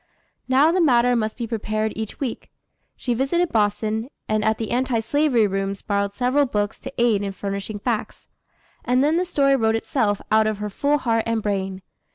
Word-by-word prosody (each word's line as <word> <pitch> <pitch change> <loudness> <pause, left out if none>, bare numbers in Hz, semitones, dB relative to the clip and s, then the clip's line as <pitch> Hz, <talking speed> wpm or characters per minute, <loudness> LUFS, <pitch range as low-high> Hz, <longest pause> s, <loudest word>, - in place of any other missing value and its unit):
Now 270 +5 +4
the 365 +1 +2
matter 245 -5 +4
must 215 -2 -1
be 240 - -3
prepared 215 -1 -2
each 220 -1 -5
week. 255 -5 -4 0.5
She 245 - -2
visited 295 +8 0
Boston, 215 +2 0 0.2
and 215 0 0
at 220 0 +2
the 225 - -4
Anti 250 -1 +1
Slavery 255 -1 +2
rooms 195 0 -2
borrowed 200 -1 -1
several 265 +3 +2
books 205 -3 -2
to 265 - -8
aid 235 -4 +3
in 200 -1 -3
furnishing 200 +2 -4
facts. 225 +1 -3 0.6
And 250 +2 +2
then 310 +3 +2
the 360 - +1
story 275 -5 +2
wrote 225 -3 +2
itself 225 -3 0
out 220 0 +4
of 215 -1 -1
her 210 0 -4
full 285 +7 +1
heart 230 -4 +1
and 225 -2 -1
brain. 190 -2 -2
225 Hz, 190 wpm, -22 LUFS, 210-260 Hz, 0.6 s, Now